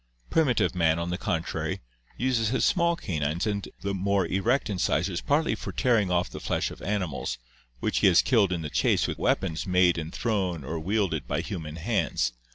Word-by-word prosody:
Primitive 140 Hz, -, +2 dB
man, 80 Hz, -3 st, +2 dB
on 85 Hz, +1 st, -2 dB
the 90 Hz, -, -1 dB
contrary, 80 Hz, -1 st, -2 dB, 0.4 s
uses 120 Hz, -3 st, +1 dB
his 130 Hz, +5 st, +1 dB
small 170 Hz, -1 st, +3 dB
canines 80 Hz, -, -2 dB
and 100 Hz, -2 st, -2 dB
more 100 Hz, -1 st, +1 dB
erect 110 Hz, +10 st, +1 dB
incisors 90 Hz, -2 st, 0 dB
partly 150 Hz, +3 st, +1 dB
for -, -, -5 dB
tearing 115 Hz, -7 st, +2 dB
off 90 Hz, 0 st, +1 dB
the -, -, -8 dB
flesh -, -, -1 dB
of -, -, -11 dB
animals, 95 Hz, -12 st, -2 dB, 0.4 s
which -, -, +1 dB
he -, -, +5 dB
has 90 Hz, -2 st, +6 dB
killed 110 Hz, -7 st, +3 dB
in 85 Hz, -3 st, -2 dB
the 75 Hz, -, -5 dB
chase -, -, +2 dB
with -, -, -4 dB
weapons 80 Hz, -3 st, 0 dB
made 90 Hz, -2 st, +4 dB
and 80 Hz, +1 st, -5 dB
thrown 95 Hz, -, -1 dB
or 80 Hz, +5 st, -4 dB
wielded 95 Hz, -3 st, -1 dB
by -, -, -1 dB
human 80 Hz, -7 st, -6 dB
hands. 80 Hz, -6 st, 0 dB
95 Hz, 180 wpm, -27 LUFS, 85-110 Hz, 0.4 s, has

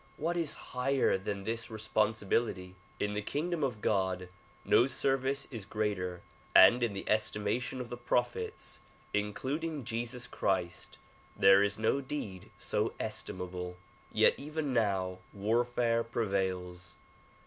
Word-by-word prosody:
What 170 Hz, +3 st, -1 dB
is 165 Hz, -3 st, +1 dB, 0.2 s
higher 130 Hz, -1 st, +2 dB
than 100 Hz, +1 st, -3 dB
this 115 Hz, +2 st, -2 dB
responsibility? 110 Hz, -3 st, 0 dB, 0.3 s
In 105 Hz, 0 st, 0 dB
the 105 Hz, -, -1 dB
kingdom 155 Hz, +8 st, -2 dB
of 120 Hz, -6 st, -1 dB
God 95 Hz, -3 st, 0 dB, 0.4 s
no 120 Hz, -, +5 dB
service 135 Hz, 0 st, 0 dB
is 115 Hz, -5 st, -5 dB
greater 95 Hz, -4 st, -2 dB, 0.3 s
and 125 Hz, -, +9 dB
in 115 Hz, -3 st, +1 dB
the 100 Hz, -, -5 dB
estimation 110 Hz, +4 st, 0 dB
of 125 Hz, -2 st, -5 dB
the 120 Hz, -, -5 dB
prophets 120 Hz, 0 st, -2 dB, 0.3 s
including 135 Hz, +9 st, -2 dB
Jesus 120 Hz, +2 st, -3 dB
Christ 90 Hz, -6 st, -2 dB, 0.4 s
there 95 Hz, 0 st, +7 dB
is 100 Hz, +1 st, +1 dB
no 110 Hz, +5 st, +1 dB
deed 120 Hz, -10 st, -5 dB
so -, -, 0 dB
estimable. 90 Hz, 0 st, -4 dB, 0.3 s
Yet -, -, +5 dB
even 150 Hz, -1 st, -3 dB
now 95 Hz, -5 st, +1 dB
warfare 115 Hz, +3 st, +1 dB
prevails. 95 Hz, -6 st, -2 dB
110 Hz, 125 wpm, -32 LUFS, 95-125 Hz, 0.4 s, and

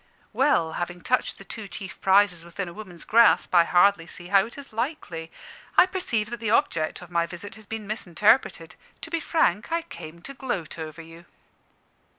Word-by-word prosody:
Well, 260 Hz, -, +2 dB
having 175 Hz, 0 st, -4 dB
touched 250 Hz, +8 st, 0 dB
the -, -, -11 dB
two 215 Hz, +1 st, -7 dB
chief 195 Hz, -1 st, -9 dB
prizes 190 Hz, -3 st, +4 dB
within 175 Hz, +2 st, -5 dB
a 170 Hz, -, -8 dB
woman's 185 Hz, -5 st, -10 dB
grasp, 230 Hz, -3 st, +4 dB
I 170 Hz, -1 st, +6 dB
hardly 175 Hz, -1 st, +4 dB
see 175 Hz, 0 st, -8 dB
how 195 Hz, +1 st, +4 dB
it 235 Hz, -, -13 dB
is 280 Hz, -5 st, -11 dB
likely. 215 Hz, -, -4 dB, 0.5 s
I -, -, +9 dB
perceive 300 Hz, -, -2 dB
that 240 Hz, -, -4 dB
the 225 Hz, -2 st, -2 dB
object 165 Hz, -6 st, +1 dB
of 175 Hz, -, -14 dB
my 170 Hz, -1 st, +1 dB
visit 180 Hz, +3 st, -9 dB
has 215 Hz, -1 st, -13 dB
been 220 Hz, 0 st, -5 dB
misinterpreted. 205 Hz, -3 st, +1 dB, 0.3 s
To 325 Hz, -, -7 dB
be 335 Hz, -, 0 dB
frank, 275 Hz, -, +1 dB
I 335 Hz, 0 st, 0 dB
came 170 Hz, -, -10 dB
to 275 Hz, -, -8 dB
gloat 240 Hz, -, -4 dB
over 160 Hz, 0 st, -7 dB
you." 165 Hz, +1 st, -14 dB
195 Hz, 185 wpm, -25 LUFS, 170-230 Hz, 0.5 s, I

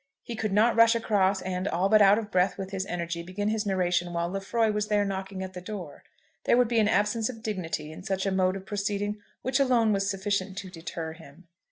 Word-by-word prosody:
He 235 Hz, -, -6 dB
could 215 Hz, -2 st, -2 dB
not 215 Hz, +4 st, +4 dB
rush 230 Hz, +1 st, +6 dB
across, 200 Hz, -4 st, +1 dB
and, 185 Hz, +1 st, -2 dB
all 180 Hz, +2 st, +1 dB
but 215 Hz, +1 st, +5 dB
out 200 Hz, +1 st, +7 dB
of 220 Hz, -2 st, -4 dB
breath 185 Hz, +1 st, +2 dB
with 195 Hz, -1 st, -6 dB
his 190 Hz, 0 st, -3 dB
energy, 170 Hz, -1 st, -3 dB
begin 190 Hz, +4 st, -3 dB
his 215 Hz, -1 st, -1 dB
narration 180 Hz, -2 st, 0 dB
while 170 Hz, 0 st, -1 dB
Lefroy 205 Hz, +4 st, 0 dB
was 210 Hz, 0 st, -1 dB
there 205 Hz, -1 st, +2 dB
knocking 190 Hz, -1 st, -4 dB
at 190 Hz, 0 st, -7 dB
the 180 Hz, -, -7 dB
door. 185 Hz, -5 st, -7 dB, 0.4 s
There -, -, +4 dB
would 250 Hz, -1 st, +4 dB
be 230 Hz, 0 st, +2 dB
an 215 Hz, -, +4 dB
absence 210 Hz, +3 st, +1 dB
of 225 Hz, -3 st, -8 dB
dignity 165 Hz, -7 st, -3 dB
in 160 Hz, -, -9 dB
such 190 Hz, +1 st, -2 dB
a 195 Hz, -, +1 dB
mode 185 Hz, 0 st, +2 dB
of 195 Hz, 0 st, -7 dB
proceeding 205 Hz, 0 st, -2 dB, 0.2 s
which 260 Hz, +2 st, +1 dB
alone 240 Hz, -5 st, +3 dB
was 195 Hz, 0 st, 0 dB
sufficient 195 Hz, -1 st, -2 dB
to 190 Hz, -2 st, -6 dB
deter 165 Hz, -2 st, -6 dB
him. 165 Hz, +1 st, -16 dB
195 Hz, 230 wpm, -27 LUFS, 185-215 Hz, 0.4 s, out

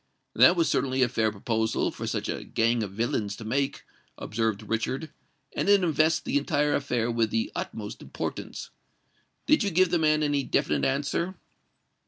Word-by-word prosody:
"That 175 Hz, -, +6 dB
was 165 Hz, -2 st, +2 dB
certainly 130 Hz, -1 st, +1 dB
a -, -, +4 dB
fair 110 Hz, -3 st, 0 dB
proposal 110 Hz, +2 st, -1 dB
for -, -, -6 dB
such -, -, -2 dB
a -, -, -3 dB
gang 115 Hz, +1 st, +1 dB
of 105 Hz, -, -3 dB
villains 105 Hz, -2 st, -1 dB
to 110 Hz, -, -9 dB
make," 135 Hz, +5 st, -1 dB, 0.3 s
observed 110 Hz, -1 st, -2 dB
Richard; 130 Hz, +7 st, -2 dB, 0.4 s
"and -, -, 0 dB
it 200 Hz, -2 st, +5 dB
invests 160 Hz, -1 st, +3 dB
the 145 Hz, -, 0 dB
entire 145 Hz, 0 st, +1 dB
affair 120 Hz, -4 st, 0 dB
with 115 Hz, -1 st, +1 dB
the 235 Hz, +8 st, -1 dB
utmost -, -, -6 dB
importance. -, -, -6 dB, 0.7 s
Did 305 Hz, -, +4 dB
you 200 Hz, -, +1 dB
give 185 Hz, 0 st, +3 dB
the 175 Hz, -, +2 dB
man 155 Hz, -1 st, +3 dB
any 145 Hz, -1 st, +1 dB
definite -, -, 0 dB
answer?" 145 Hz, +7 st, -1 dB
140 Hz, 170 wpm, -27 LUFS, 115-160 Hz, 0.7 s, That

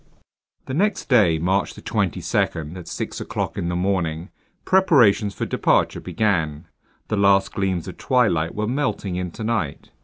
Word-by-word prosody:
THE 130 Hz, -, -5 dB
NEXT 200 Hz, +4 st, 0 dB
DAY, 105 Hz, -, +4 dB
March 95 Hz, +4 st, 0 dB
22, -, -, -2 dB, 0.4 s
at 90 Hz, -2 st, -9 dB
six -, -, -5 dB
o'clock -, -, -3 dB
in 85 Hz, -, -2 dB
the 90 Hz, -, -2 dB
morning, 90 Hz, -2 st, -1 dB, 0.3 s
preparations 120 Hz, -, +4 dB
for -, -, -2 dB
departure -, -, +1 dB
began. 80 Hz, -9 st, -1 dB, 0.4 s
The 110 Hz, -, 0 dB
last 100 Hz, -1 st, +3 dB
gleams 95 Hz, -3 st, -1 dB
of 90 Hz, -, -8 dB
twilight 105 Hz, -11 st, +1 dB
were 105 Hz, -, -1 dB
melting 110 Hz, -7 st, -2 dB
into 90 Hz, +4 st, -5 dB
night. 110 Hz, -11 st, -2 dB
100 Hz, 145 wpm, -22 LUFS, 85-110 Hz, 0.4 s, DAY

